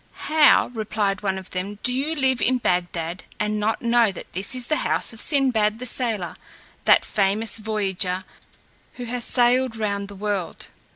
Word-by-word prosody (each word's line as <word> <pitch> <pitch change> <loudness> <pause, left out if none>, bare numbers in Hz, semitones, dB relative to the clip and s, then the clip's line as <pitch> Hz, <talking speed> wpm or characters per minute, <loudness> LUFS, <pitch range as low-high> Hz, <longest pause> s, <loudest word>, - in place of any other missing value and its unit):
"How," 305 -4 +4
replied 210 -3 -2
one 195 -2 -1
of 190 -1 -9
them, 195 +3 -4
"do 250 - +1
you 285 +5 -1
live 260 -5 +1
in 255 +4 +3
Bagdad, 175 -4 -2 0.2
and 210 0 -1
know 215 +2 +1
not 235 -4 +2
that - - -10
this 190 +7 -1
is 250 -1 -1
the 305 +4 0
house - - 0
of 225 - -3
Sinbad, 240 -7 +2
the 250 - -6
sailor, 225 -7 -1 0.5
that - - +5
famous 210 +3 +1
voyager, 195 -4 -2 0.7
who 245 - -8
has 240 +1 -4
sailed 245 0 +3
round 200 -2 -2
the 200 - -11
world?" 195 -4 -4
215 Hz, 170 wpm, -23 LUFS, 195-245 Hz, 0.7 s, that